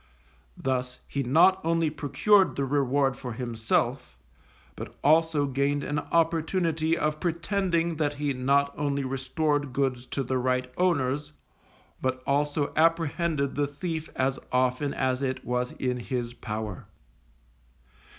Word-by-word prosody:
Thus 125 -1 -2
he 140 - -2
not 165 +9 +4
only 165 -1 +1
procured 165 +7 +3
the 140 - 0
reward 135 -1 +1
for 125 -2 -6
himself, 120 - -1 0.6
but - - -8
also 155 0 +4
gained 140 +1 0
an 145 0 -1
opportunity 165 0 +1
of 155 0 -1
pretending 170 -1 0
that 150 -2 0
he 145 -1 -1
not 140 +2 +2
only 140 -1 -1
restored 135 +2 -1
goods 130 -2 -1
to 135 - -2
the 130 +1 -1
right 125 0 -1
owners, 150 -4 0 0.7
but 130 0 -1
also 145 +1 0
apprehended 165 -2 +1
the 145 0 0
thief 160 +2 -4
as 135 +1 0
often 130 +3 +1
as 130 0 0
it 130 -1 -2
was 125 0 -1
in 125 -1 -2
his 120 -1 -3
power. 110 -5 -5
140 Hz, 130 wpm, -27 LUFS, 130-160 Hz, 0.7 s, not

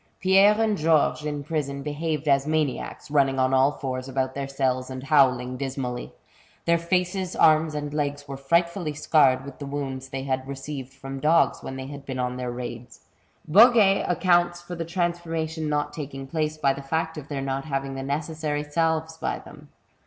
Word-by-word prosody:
Pierre 195 +3 +5
and 215 -3 +1
Georges 155 -1 +2
in 145 -1 -3
prison 140 -2 -3
behaved 150 0 -3
as 140 0 +3
maniacs, 150 -3 -2
running 135 -2 +3
on 130 0 +2
all 135 +2 +4
fours 130 -1 -4
about 130 0 -1
their 140 0 -4
cells 130 -2 -1
and 130 0 -6
howling 130 -3 +3
dismally. 130 -2 -4 0.5
Their 170 0 +3
faces, 180 +1 -1
arms, 155 0 +4
and 145 0 -4
legs 145 -1 -2
were 135 - -5
frightfally 170 +3 0
scarred 135 -5 +3
with 140 0 -10
the 140 - -6
wounds 135 -2 -4
they 135 0 -4
had 130 -1 -2
received 135 -1 -6
from 135 0 -8
dogs 155 +4 +3
when 130 - -6
they 130 0 -6
had 140 0 -8
been 130 -2 -5
on 125 0 -2
their 125 -1 -3
raids. 120 -1 -7 0.5
Boguet 205 +2 +6
accounts 175 0 +2
for 175 0 -9
the 165 -1 -4
transformation 165 -2 -2
not 145 0 -1
taking 135 -3 -6
place, 155 +2 -2
by 140 -3 +2
the 140 - -7
&ct 160 +3 -2
of 145 - -11
their 140 -2 -4
not 135 +1 -2
having 135 -2 -3
the 135 - -5
necessary 150 +1 -2
salves 160 +1 -1
by - - -2
them. - - -14
145 Hz, 180 wpm, -25 LUFS, 135-160 Hz, 0.5 s, Boguet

